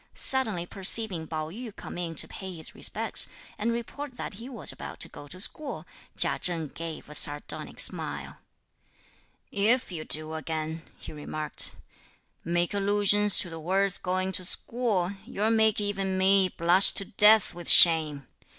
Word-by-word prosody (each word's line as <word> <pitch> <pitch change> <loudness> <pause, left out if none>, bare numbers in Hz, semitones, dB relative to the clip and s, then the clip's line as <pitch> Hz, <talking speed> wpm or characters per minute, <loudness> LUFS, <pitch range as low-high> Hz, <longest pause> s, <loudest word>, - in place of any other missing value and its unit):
Suddenly 220 -10 +2
perceiving 190 -2 +1
Pao 155 -1 -5
yü 225 +1 -9
come - - -10
in 165 -2 -5
to - - +1
pay 190 -2 -9
his 160 -1 -8
respects, - - +2 0.3
and 225 +2 -1
report 245 +3 -7
that - - -7
he 230 +6 -10
was 230 -10 -2
about - - -10
to - - -4
go 145 - -13
to 185 +6 -9
school, 280 +8 -4 0.3
Chia - - +4
Cheng 165 -4 -2
gave 165 +1 -8
a 150 - -12
sardonic 145 -1 0
smile. - - -1 1.1
"If 225 +3 0
you 160 -3 -6
do 155 0 -5
again," 160 0 -5 0.2
he - - -11
remarked, 150 0 -2 0.7
"make 175 +2 -1
allusions 205 0 +4
to 175 - -4
the 165 - -8
words 190 +4 +1
going 185 +1 -2
to 185 - -1
school, 205 -2 -1
you'll 215 +3 -2
make 220 -1 +2
even 195 -2 -2
me 190 0 +3
blush 175 +3 +4
to 195 - +3
death 210 +3 +4
with 175 0 -2
shame! 155 -5 +6
185 Hz, 160 wpm, -26 LUFS, 165-210 Hz, 1.1 s, shame